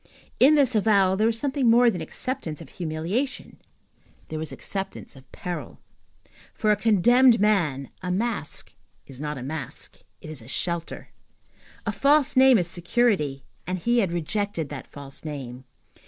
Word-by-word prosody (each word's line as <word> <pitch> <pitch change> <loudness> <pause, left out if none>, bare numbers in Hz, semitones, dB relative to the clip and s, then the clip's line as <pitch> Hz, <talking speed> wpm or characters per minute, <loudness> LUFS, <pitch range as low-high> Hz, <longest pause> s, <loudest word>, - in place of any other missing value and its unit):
In 285 +4 +7
this 275 -4 +3
avowal 200 -3 +3
there 215 +3 +2
was 225 0 0
something 270 -1 +1
more 240 +1 +6
than 180 -5 -5
acceptance 160 - -4
of 160 - -11
humiliation, 175 - -4 0.7
there 155 - -4
was 160 - -4
acceptance 195 -6 -6
of 130 -1 -17
peril. 180 -1 -6 0.8
For 215 - +2
a - - +4
condemned 230 +4 +5
man, 170 -11 +1
a 180 - -4
mask 200 -4 -3 0.3
is 135 0 -11
not 150 -1 -3
a 125 - -6
mask, 140 -2 -6 0.2
it 155 - -9
is 150 -5 -8
a 115 - -14
shelter. 170 +4 -3 0.8
A 215 - 0
false 280 +6 +3
name 260 -1 +7
is 175 -4 0
security, 175 - 0 0.2
and 185 0 -1
he 235 +7 +1
had 195 -6 +1
rejected 175 -1 -2
that 140 -4 -7
false 140 -1 -10
name. 130 -4 -7
185 Hz, 155 wpm, -25 LUFS, 155-230 Hz, 0.8 s, In